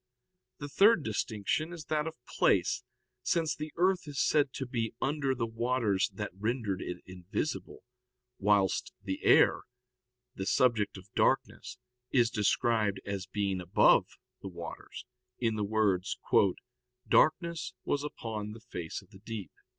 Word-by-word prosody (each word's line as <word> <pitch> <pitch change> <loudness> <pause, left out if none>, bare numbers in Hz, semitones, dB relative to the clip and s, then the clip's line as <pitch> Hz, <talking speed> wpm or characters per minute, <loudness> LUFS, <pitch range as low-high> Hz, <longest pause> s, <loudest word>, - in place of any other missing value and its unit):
The 145 - -6
third 195 +4 +5
distinction 110 - -1
is 165 -4 -8
that 155 +1 0
of 160 - -6
place; - - +2 0.4
since 165 -3 0
the 155 0 -6
earth 180 0 +2
is 145 -2 -5
said 145 0 +3
to 135 - -4
be 115 -3 -3
under 140 -2 0
the 120 -2 -1
waters 115 -3 0
that 105 -2 -4
rendered 105 -1 -2
it 90 0 -6
invisible, 95 - -4 0.6
whilst 100 -2 +2
the 95 -1 -4
air, - - +5 0.7
the 95 - -5
subject 110 -2 +2
of 95 +1 -14
darkness, - - 0 0.3
is 120 -2 +3
described 105 -1 +1
as 100 -2 -4
being 100 -2 -1
above 90 - +4 0.3
the 95 - -6
waters, 85 -2 -8 0.3
in 115 -2 0
the 105 - -1
words: 100 -3 +1 0.9
"Darkness 165 -3 +2
was 145 0 -1
upon 110 -7 -5
the 115 - -10
face 90 -7 -6
of 95 - -25
the 95 - -14
deep." 110 -4 -6
110 Hz, 140 wpm, -31 LUFS, 100-140 Hz, 0.9 s, third